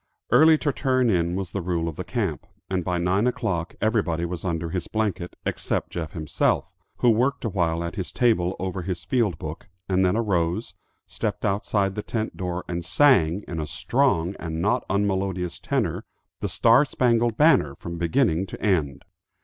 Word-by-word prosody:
Early 155 Hz, +6 st, +7 dB
to 145 Hz, -2 st, -1 dB
turn 130 Hz, -3 st, +2 dB
in 85 Hz, -1 st, +1 dB
was 95 Hz, -3 st, -4 dB
the 100 Hz, -, -3 dB
rule 85 Hz, -2 st, -1 dB
of 80 Hz, -, -4 dB
the 90 Hz, -, -4 dB
camp, 95 Hz, -, -3 dB, 0.2 s
and 95 Hz, -2 st, 0 dB
by 90 Hz, +1 st, -1 dB
nine 95 Hz, +6 st, +2 dB
o'clock 95 Hz, -10 st, -2 dB
everybody 95 Hz, -7 st, +1 dB
was 85 Hz, -1 st, -5 dB
under 85 Hz, -2 st, -2 dB
his 90 Hz, -1 st, -3 dB
blanket, 105 Hz, -5 st, -2 dB
except -, -, -2 dB
Jeff 80 Hz, -4 st, -5 dB
himself, 80 Hz, -3 st, 0 dB, 0.3 s
who 120 Hz, -, +4 dB
worked 125 Hz, +3 st, +1 dB
awhile 85 Hz, -6 st, 0 dB
at 85 Hz, +5 st, -5 dB
his 95 Hz, -, -4 dB
table 100 Hz, -7 st, +2 dB
over 95 Hz, 0 st, -3 dB
his 90 Hz, -1 st, -4 dB
field 110 Hz, -, +1 dB
book, 80 Hz, +4 st, -7 dB, 0.2 s
and 95 Hz, 0 st, +2 dB
then 95 Hz, +3 st, +2 dB
arose, 90 Hz, -7 st, 0 dB, 0.3 s
stepped -, -, -3 dB
outside 100 Hz, -1 st, 0 dB
the 105 Hz, -, -3 dB
tent 110 Hz, 0 st, -3 dB
door 90 Hz, -1 st, -4 dB
and 85 Hz, 0 st, -3 dB
sang, 100 Hz, -, +3 dB
in 80 Hz, -, -4 dB
a 75 Hz, -, -3 dB
strong 100 Hz, -, +1 dB
and 80 Hz, -1 st, -4 dB
not 100 Hz, +5 st, +1 dB
unmelodious 95 Hz, -3 st, -1 dB
tenor, -, -, -1 dB, 0.4 s
the -, -, -2 dB
Star 120 Hz, +4 st, +5 dB
Spangled 120 Hz, -4 st, +1 dB
Banner 145 Hz, -, +4 dB
from 85 Hz, +2 st, -7 dB
beginning 90 Hz, -1 st, +1 dB
to -, -, -8 dB
end. 80 Hz, -10 st, 0 dB
95 Hz, 175 wpm, -24 LUFS, 85-110 Hz, 0.4 s, Early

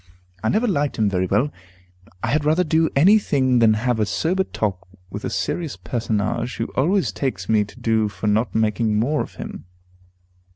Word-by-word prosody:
I 110 Hz, -, +1 dB
never 225 Hz, +4 st, +1 dB
liked 145 Hz, -8 st, 0 dB
him 105 Hz, -2 st, +2 dB
very 95 Hz, -1 st, 0 dB
well; 140 Hz, +10 st, +1 dB, 0.7 s
I -, -, 0 dB
had 150 Hz, +1 st, +1 dB
rather 155 Hz, +4 st, +3 dB
do 160 Hz, -1 st, +2 dB
any 190 Hz, +10 st, +6 dB
thing 130 Hz, -9 st, +1 dB
than 110 Hz, -2 st, +5 dB
have 120 Hz, +1 st, 0 dB
a 105 Hz, -, +2 dB
sober 185 Hz, -, 0 dB
talk 95 Hz, -, -3 dB, 0.2 s
with 105 Hz, +2 st, -6 dB
a -, -, -2 dB
serious 165 Hz, -5 st, -3 dB
personage, 115 Hz, 0 st, -2 dB
who 115 Hz, -, -4 dB
always 185 Hz, +8 st, +2 dB
takes 105 Hz, -10 st, -3 dB
me 110 Hz, -2 st, +3 dB
to 105 Hz, +5 st, -15 dB
do 110 Hz, -2 st, +1 dB
for 105 Hz, -, -7 dB
not 105 Hz, +3 st, +1 dB
making 110 Hz, 0 st, +1 dB
more 145 Hz, +7 st, +1 dB
of -, -, -7 dB
him. -, -, -8 dB
120 Hz, 190 wpm, -22 LUFS, 105-155 Hz, 0.7 s, any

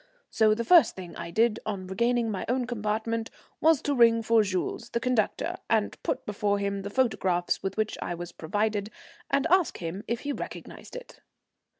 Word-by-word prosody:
So 215 Hz, -1 st, +4 dB
the 235 Hz, +1 st, -3 dB
first 345 Hz, +2 st, +6 dB
thing 180 Hz, -3 st, -9 dB
I 170 Hz, 0 st, -6 dB
did 225 Hz, +4 st, +2 dB
on 200 Hz, -3 st, -4 dB
regaining 235 Hz, +4 st, +1 dB
my 195 Hz, -, -3 dB
own 250 Hz, 0 st, +1 dB
compartment 225 Hz, 0 st, -2 dB, 0.3 s
was 320 Hz, -3 st, +4 dB
to 290 Hz, -, 0 dB
ring 230 Hz, -3 st, +5 dB
for 225 Hz, 0 st, +4 dB
Jules, 190 Hz, -3 st, -2 dB
the 235 Hz, -, -1 dB
conductor, 235 Hz, -3 st, 0 dB
and 220 Hz, -2 st, 0 dB
put -, -, -2 dB
before 205 Hz, -1 st, 0 dB
him 200 Hz, 0 st, -2 dB
the 200 Hz, -, -5 dB
photograph 190 Hz, -7 st, +1 dB
with 195 Hz, +1 st, -4 dB
which 215 Hz, 0 st, -1 dB
I 175 Hz, -, -3 dB
was 175 Hz, 0 st, -7 dB
provided, 205 Hz, +5 st, -1 dB, 0.4 s
and 280 Hz, -, +2 dB
ask 370 Hz, -3 st, +3 dB
him 180 Hz, +4 st, -5 dB
if 235 Hz, 0 st, -2 dB
he 290 Hz, -, -3 dB
recognized -, -, -8 dB
it. -, -, -10 dB
215 Hz, 185 wpm, -27 LUFS, 195-235 Hz, 0.4 s, first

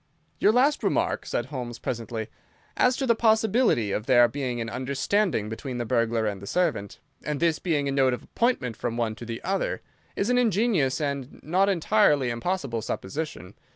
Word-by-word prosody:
"Your 210 Hz, -, +5 dB
last 270 Hz, +6 st, +3 dB
remark," -, -, 0 dB
said -, -, -1 dB
Holmes, 125 Hz, -4 st, -6 dB
presently, 115 Hz, -2 st, -4 dB, 0.5 s
"as 250 Hz, 0 st, +3 dB
to 270 Hz, -, -1 dB
the 235 Hz, -, +4 dB
possibility 220 Hz, -, +2 dB
of 105 Hz, +3 st, -3 dB
there 120 Hz, -1 st, +6 dB
being 130 Hz, -3 st, -3 dB
an 115 Hz, -, -3 dB
understanding 135 Hz, -, 0 dB
between 125 Hz, +4 st, -5 dB
the 120 Hz, -, -2 dB
burglar 115 Hz, -1 st, +1 dB
and 100 Hz, -3 st, -3 dB
the 100 Hz, -, -9 dB
servant, 155 Hz, -, -1 dB, 0.3 s
and 150 Hz, -2 st, -3 dB
this 165 Hz, -2 st, +2 dB
being 150 Hz, -5 st, 0 dB
a -, -, 0 dB
note 135 Hz, -2 st, +3 dB
of -, -, -13 dB
appointment 230 Hz, -, 0 dB
from 120 Hz, +1 st, -3 dB
one 115 Hz, -2 st, 0 dB
to 110 Hz, +2 st, -10 dB
the 115 Hz, -1 st, -6 dB
other, 195 Hz, +2 st, -1 dB, 0.3 s
is 205 Hz, +5 st, 0 dB
an 250 Hz, -, +3 dB
ingenious 205 Hz, -, +2 dB
and 140 Hz, -3 st, -3 dB
not 185 Hz, +5 st, +2 dB
entirely 165 Hz, -, +3 dB
impossible 120 Hz, -2 st, -2 dB
supposition. 110 Hz, -, -5 dB
135 Hz, 180 wpm, -26 LUFS, 115-195 Hz, 0.5 s, there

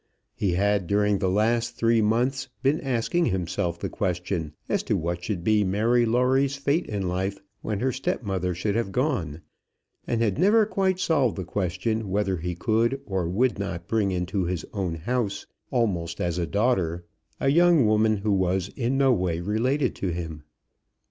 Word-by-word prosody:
He 95 Hz, -4 st, -1 dB
had 100 Hz, 0 st, +1 dB
during 105 Hz, 0 st, +2 dB
the 95 Hz, -, +1 dB
last 115 Hz, +4 st, +1 dB
three 115 Hz, -1 st, +3 dB
months 125 Hz, +5 st, 0 dB
been 140 Hz, +4 st, +2 dB
asking 135 Hz, +7 st, 0 dB
himself 90 Hz, -2 st, -1 dB
the -, -, -3 dB
question 90 Hz, -4 st, -2 dB
as -, -, 0 dB
to -, -, 0 dB
what 85 Hz, +2 st, -3 dB
should 90 Hz, -3 st, -3 dB
be 105 Hz, +1 st, +3 dB
Mary 115 Hz, +5 st, +2 dB
Lawrie's 130 Hz, +4 st, +2 dB
fate 140 Hz, +4 st, 0 dB
in 100 Hz, -3 st, -2 dB
life 95 Hz, +2 st, -2 dB, 0.2 s
when 105 Hz, -1 st, -3 dB
her 130 Hz, +1 st, +1 dB
step 130 Hz, 0 st, -2 dB
mother 90 Hz, -3 st, -2 dB
should 100 Hz, +4 st, -1 dB
have 115 Hz, -3 st, -1 dB
gone, 95 Hz, -, -1 dB, 0.7 s
and 115 Hz, -, 0 dB
had 110 Hz, +3 st, 0 dB
never 210 Hz, +4 st, +5 dB
quite 190 Hz, -3 st, 0 dB
solved 145 Hz, -, +2 dB
the 95 Hz, -, -4 dB
question 100 Hz, +4 st, -2 dB
whether 95 Hz, -1 st, 0 dB
he 90 Hz, +2 st, -4 dB
could 115 Hz, +7 st, +1 dB
or 95 Hz, -4 st, -2 dB
would 120 Hz, +5 st, +1 dB
not 90 Hz, -4 st, -4 dB
bring 110 Hz, -3 st, +1 dB
into 90 Hz, +1 st, -1 dB
his 90 Hz, -3 st, -3 dB
own 95 Hz, -5 st, -2 dB
house, 100 Hz, +3 st, -2 dB, 0.2 s
almost 90 Hz, -, -1 dB
as 85 Hz, 0 st, -1 dB
a 85 Hz, -, -1 dB
daughter, 90 Hz, -3 st, 0 dB, 0.3 s
a 135 Hz, -, +2 dB
young 170 Hz, -2 st, +5 dB
woman 110 Hz, 0 st, +3 dB
who 105 Hz, +2 st, -1 dB
was 95 Hz, 0 st, +1 dB
in 125 Hz, +2 st, -1 dB
no 135 Hz, -2 st, +4 dB
way 90 Hz, -6 st, -1 dB
related 115 Hz, +10 st, 0 dB
to 95 Hz, -, -2 dB
him. 80 Hz, -3 st, -4 dB
105 Hz, 175 wpm, -25 LUFS, 90-125 Hz, 0.7 s, never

